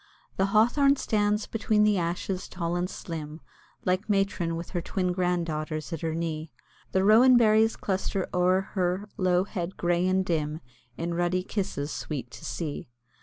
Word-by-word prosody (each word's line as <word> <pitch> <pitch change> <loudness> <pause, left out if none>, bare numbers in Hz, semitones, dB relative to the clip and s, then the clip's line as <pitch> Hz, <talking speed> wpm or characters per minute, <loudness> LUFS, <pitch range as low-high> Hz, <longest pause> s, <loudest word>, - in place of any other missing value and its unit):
The 195 - +2
Hawthorn 245 +7 +4
stands 210 -4 0
between 215 -1 +1
the 210 -2 +3
ashes 175 +2 -2
tall 170 -1 -3
and 175 +1 -1
slim, 155 -4 -6 0.5
Like 185 +4 0
matron 195 -4 +1
with 170 +1 -6
her 175 - -1
twin 180 +1 -1
grand 180 -1 0
daughters 155 +1 -4
at 165 - -4
her 160 -1 -2
knee; 160 -1 -3 0.4
The 190 - +2
rowan 240 +5 +7
berries 220 -1 +4
cluster 190 -1 -2
o'er 180 +1 +3
her 185 +1 0
low 180 -1 +3
head 185 -2 -5
grey 175 +1 +1
and 190 0 +2
dim 155 -2 -1 0.4
In 170 +1 -2
ruddy 175 +1 0
kisses 185 -8 -3
sweet 130 -6 -5
to - - -11
see. 150 -7 -4
180 Hz, 165 wpm, -27 LUFS, 170-200 Hz, 0.5 s, rowan